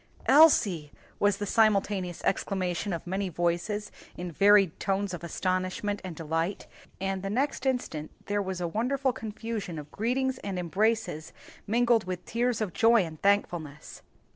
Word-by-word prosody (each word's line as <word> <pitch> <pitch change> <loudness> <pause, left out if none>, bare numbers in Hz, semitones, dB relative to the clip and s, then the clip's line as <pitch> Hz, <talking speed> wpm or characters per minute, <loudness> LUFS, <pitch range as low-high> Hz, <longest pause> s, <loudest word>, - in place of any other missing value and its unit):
"Elsie!" 210 - +5 0.3
was 205 -1 +3
the 205 - -3
simultaneous 200 -4 +1
exclamation 190 0 -1
of 170 -2 -4
many 190 +2 -2
voices 175 +5 -1 0.3
in 175 0 -5
varied 200 0 +4
tones 195 -1 -1
of 175 -1 -6
astonishment 185 +3 -2
and 180 -3 -6
delight, 165 +4 -2 0.3
and 195 0 -2
the 195 - -4
next 265 +4 -1
instant 205 - -2 0.2
there 205 0 0
was 190 -2 -4
a 175 - -1
wonderful 255 +7 0
confusion 220 -5 -5
of 150 0 -8
greetings 255 +4 -1
and 195 -2 -4
embraces 180 -2 -1 0.3
mingled 235 -1 +3
with 185 -1 -5
tears 240 -1 0
of 200 -5 -2
joy 230 -2 +5
and 160 -2 -10
thankfulness. 175 -7 -1
195 Hz, 145 wpm, -28 LUFS, 175-220 Hz, 0.3 s, Elsie